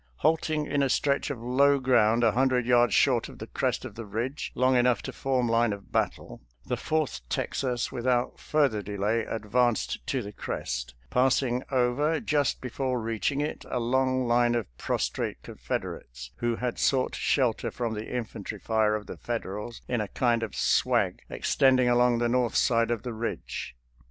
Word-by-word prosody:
Halting 155 Hz, -1 st, +2 dB
in 145 Hz, -1 st, 0 dB
a 135 Hz, -, +2 dB
stretch 140 Hz, +3 st, +1 dB
of 140 Hz, -5 st, -4 dB
low 140 Hz, +3 st, +4 dB
ground 120 Hz, -3 st, +3 dB
a 115 Hz, -, +5 dB
hundred 125 Hz, +1 st, +2 dB
yards 120 Hz, -3 st, +4 dB
short -, -, +3 dB
of -, -, -12 dB
the -, -, -7 dB
crest -, -, -2 dB
of -, -, -7 dB
the 115 Hz, +2 st, -7 dB
ridge, 115 Hz, +7 st, -4 dB
long 130 Hz, +1 st, +3 dB
enough 125 Hz, -1 st, +3 dB
to -, -, -6 dB
form 130 Hz, -2 st, 0 dB
line 115 Hz, 0 st, +2 dB
of 100 Hz, -1 st, -7 dB
battle, -, -, -2 dB, 0.2 s
the -, -, -1 dB
Fourth 155 Hz, -, -1 dB
Texas 125 Hz, -3 st, -1 dB
without 120 Hz, 0 st, 0 dB
further 140 Hz, -9 st, +1 dB
delay 105 Hz, +3 st, -1 dB
advanced 115 Hz, -, 0 dB
to -, -, -1 dB
the 100 Hz, -, -7 dB
crest, 60 Hz, -9 st, -4 dB, 0.2 s
passing 125 Hz, -1 st, +2 dB
over, 135 Hz, +5 st, +1 dB
just 145 Hz, -2 st, 0 dB
before 130 Hz, 0 st, -2 dB
reaching 115 Hz, +5 st, -1 dB
it, 150 Hz, -, -3 dB
a -, -, -1 dB
long 130 Hz, +1 st, +1 dB
line 120 Hz, 0 st, +3 dB
of 115 Hz, -3 st, 0 dB
pros -, -, -1 dB
trate -, -, -4 dB
Confederates -, -, -6 dB
who 120 Hz, -1 st, 0 dB
had 125 Hz, 0 st, -3 dB
sought 130 Hz, -2 st, +2 dB
shelter 125 Hz, -5 st, +1 dB
from 120 Hz, -2 st, -3 dB
the 105 Hz, 0 st, -5 dB
infantry 120 Hz, -5 st, -5 dB
fire 110 Hz, -1 st, +1 dB
of 105 Hz, -1 st, -5 dB
the -, -, -8 dB
Federals 115 Hz, -1 st, -5 dB
in 120 Hz, -3 st, 0 dB
a 105 Hz, -, -3 dB
kind 120 Hz, +1 st, +1 dB
of 115 Hz, -3 st, -4 dB
swag -, -, +2 dB
extending 130 Hz, -2 st, +3 dB
along 120 Hz, 0 st, +4 dB
the 120 Hz, 0 st, +1 dB
north 120 Hz, -1 st, +1 dB
side 115 Hz, -1 st, +3 dB
of 120 Hz, -2 st, -1 dB
the 125 Hz, -2 st, -4 dB
ridge. 110 Hz, -, -5 dB
120 Hz, 175 wpm, -27 LUFS, 115-130 Hz, 0.2 s, a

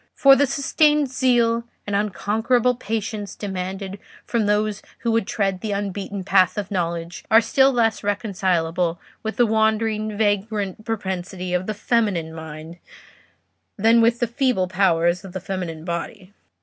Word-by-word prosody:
For 275 Hz, -1 st, +7 dB
the 285 Hz, +1 st, +3 dB
sustained 295 Hz, +1 st, +2 dB
zeal 235 Hz, -3 st, +2 dB, 0.2 s
and 205 Hz, -, -2 dB
unconquerable 220 Hz, +4 st, +1 dB
patience 215 Hz, -3 st, -4 dB
demanded 190 Hz, 0 st, -5 dB, 0.3 s
from 230 Hz, -3 st, 0 dB
those 210 Hz, 0 st, 0 dB, 0.2 s
who 235 Hz, -, 0 dB
would 225 Hz, -3 st, +1 dB
tread 195 Hz, -4 st, -1 dB
the 215 Hz, -2 st, -2 dB
unbeaten 200 Hz, 0 st, -4 dB
paths 190 Hz, 0 st, +3 dB
of 205 Hz, -2 st, -4 dB
knowledge 170 Hz, -2 st, -3 dB
are 220 Hz, -, +7 dB
still 265 Hz, +4 st, +3 dB
less 230 Hz, -4 st, +1 dB
reconcilable 180 Hz, -5 st, 0 dB, 0.2 s
with 220 Hz, 0 st, -4 dB
the 245 Hz, -, +4 dB
wandering, 220 Hz, -1 st, 0 dB
vagrant 205 Hz, -1 st, -1 dB
propensity 185 Hz, -4 st, -4 dB
of 180 Hz, +1 st, -1 dB
the 215 Hz, -, -2 dB
feminine 205 Hz, -8 st, 0 dB
mind 160 Hz, +1 st, -9 dB, 1.0 s
than 225 Hz, +3 st, +5 dB
with 230 Hz, +1 st, +3 dB
the 240 Hz, -, +2 dB
feeble 240 Hz, -5 st, 0 dB
powers 175 Hz, -1 st, +2 dB
of 190 Hz, -2 st, -10 dB
the 185 Hz, -, -3 dB
feminine 175 Hz, -4 st, -5 dB
body." 185 Hz, +3 st, -5 dB
205 Hz, 145 wpm, -22 LUFS, 185-225 Hz, 1.0 s, For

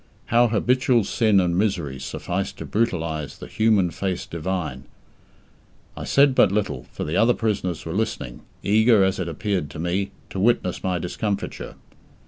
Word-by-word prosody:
How 120 Hz, +1 st, +6 dB
habitual 120 Hz, +1 st, +2 dB
sin 110 Hz, -1 st, +3 dB
and 90 Hz, -2 st, +1 dB
misery 85 Hz, -9 st, -1 dB
suffice -, -, -3 dB
to -, -, -8 dB
brutalize 80 Hz, -, -1 dB
"the -, -, -9 dB
human 105 Hz, -5 st, +2 dB
face 95 Hz, -1 st, -3 dB
divine"! 80 Hz, -6 st, -4 dB, 1.1 s
I -, -, -6 dB
said 140 Hz, -1 st, +4 dB
but 130 Hz, -, +5 dB
little, 105 Hz, 0 st, -2 dB
for -, -, -5 dB
the 75 Hz, -, -3 dB
other 120 Hz, +2 st, +4 dB
prisoners 95 Hz, -7 st, -2 dB
were 80 Hz, -, -4 dB
listening, 100 Hz, -, -3 dB, 0.2 s
eager, 110 Hz, 0 st, +5 dB
as 95 Hz, 0 st, +1 dB
it 90 Hz, -, -2 dB
appeared 90 Hz, -2 st, -2 dB
to 75 Hz, -, -9 dB
me, 90 Hz, +4 st, -1 dB, 0.2 s
to 95 Hz, -, -4 dB
witness 100 Hz, -4 st, +1 dB
my 90 Hz, -1 st, 0 dB
discomfiture. 100 Hz, +4 st, -4 dB
95 Hz, 155 wpm, -23 LUFS, 85-110 Hz, 1.1 s, How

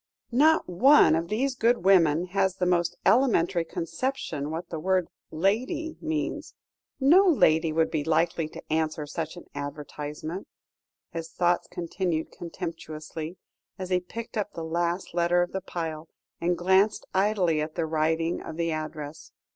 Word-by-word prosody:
"Not 310 Hz, +6 st, +4 dB
one 235 Hz, -, +6 dB
of 165 Hz, +1 st, 0 dB
these 250 Hz, +7 st, 0 dB
good 235 Hz, -5 st, +1 dB
women 170 Hz, -4 st, +5 dB
has 190 Hz, 0 st, +1 dB
the 185 Hz, -, -1 dB
most 175 Hz, -1 st, +1 dB
elementary 195 Hz, -9 st, +3 dB
conception 165 Hz, -, -3 dB
what 165 Hz, +2 st, -5 dB
the 165 Hz, -, -3 dB
word 185 Hz, +1 st, +1 dB, 0.2 s
'lady' 255 Hz, -, -1 dB
means. 315 Hz, -1 st, -3 dB, 0.4 s
No 340 Hz, +9 st, +6 dB
lady 160 Hz, -, +4 dB
would 160 Hz, +1 st, +1 dB
be 155 Hz, -3 st, -1 dB
likely 165 Hz, +1 st, +1 dB
to -, -, -10 dB
answer 155 Hz, -1 st, 0 dB
such 160 Hz, +3 st, -5 dB
an 175 Hz, -, -10 dB
advertisement," 150 Hz, +4 st, -6 dB, 0.6 s
his 165 Hz, -1 st, -5 dB
thoughts 175 Hz, -1 st, +1 dB
continued 170 Hz, -2 st, -2 dB
contemptuously, 165 Hz, -1 st, -7 dB, 0.4 s
as 185 Hz, 0 st, -6 dB
he 180 Hz, -, +3 dB
picked 225 Hz, +6 st, -7 dB
up 210 Hz, -1 st, -2 dB
the 165 Hz, -, -5 dB
last 170 Hz, +2 st, -2 dB
letter 175 Hz, +1 st, +3 dB
of 175 Hz, -, -5 dB
the 190 Hz, -, -3 dB
pile, 165 Hz, -3 st, -5 dB, 0.3 s
and 175 Hz, +1 st, 0 dB
glanced 190 Hz, +4 st, +3 dB
idly 190 Hz, -5 st, +2 dB
at 155 Hz, +1 st, -4 dB
the 165 Hz, -, 0 dB
writing 160 Hz, +2 st, 0 dB
of 160 Hz, -, -8 dB
the 165 Hz, -1 st, 0 dB
address. 155 Hz, -1 st, -6 dB
170 Hz, 150 wpm, -27 LUFS, 160-195 Hz, 0.6 s, one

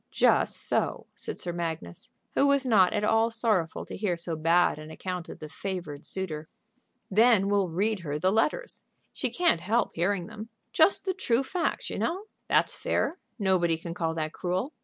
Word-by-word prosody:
"Just -, -, +3 dB
so," -, -, -1 dB
said -, -, -2 dB
Sir 175 Hz, -, -3 dB
Magnus, 165 Hz, -, -5 dB, 0.2 s
who 280 Hz, -, +3 dB
was 280 Hz, -1 st, +3 dB
not 205 Hz, -7 st, +5 dB
at 210 Hz, -, -1 dB
all 225 Hz, +1 st, +3 dB
sorrowful 220 Hz, -8 st, +1 dB
to -, -, -7 dB
hear 185 Hz, -4 st, -1 dB
so 170 Hz, -1 st, -3 dB
bad 165 Hz, +1 st, +3 dB
an 155 Hz, 0 st, -9 dB
account 180 Hz, +1 st, -5 dB
of -, -, -8 dB
the 155 Hz, -, -8 dB
favored 175 Hz, -3 st, -5 dB
suitor. 160 Hz, -5 st, -3 dB, 0.6 s
"Then 215 Hz, -1 st, +5 dB
we'll 200 Hz, -3 st, +2 dB
read 205 Hz, +5 st, 0 dB
her 150 Hz, -4 st, -3 dB
the 185 Hz, +5 st, +2 dB
letters. 305 Hz, -, 0 dB, 0.3 s
She -, -, -1 dB
can't 345 Hz, -, +2 dB
help 225 Hz, +6 st, +1 dB
hearing 180 Hz, +1 st, 0 dB
them. 220 Hz, +2 st, -9 dB, 0.2 s
Just 400 Hz, -, +4 dB
the 380 Hz, -, 0 dB
true 260 Hz, -9 st, +1 dB
facts, 340 Hz, +6 st, -2 dB
you -, -, -4 dB
know. 365 Hz, +4 st, -1 dB, 0.2 s
That's -, -, +2 dB
fair; 350 Hz, -, -1 dB, 0.2 s
nobody 185 Hz, -5 st, +2 dB
can 170 Hz, +1 st, -6 dB
call 165 Hz, -2 st, -2 dB
that 155 Hz, -1 st, -3 dB
cruel. 185 Hz, -, -2 dB
190 Hz, 180 wpm, -28 LUFS, 165-225 Hz, 0.6 s, not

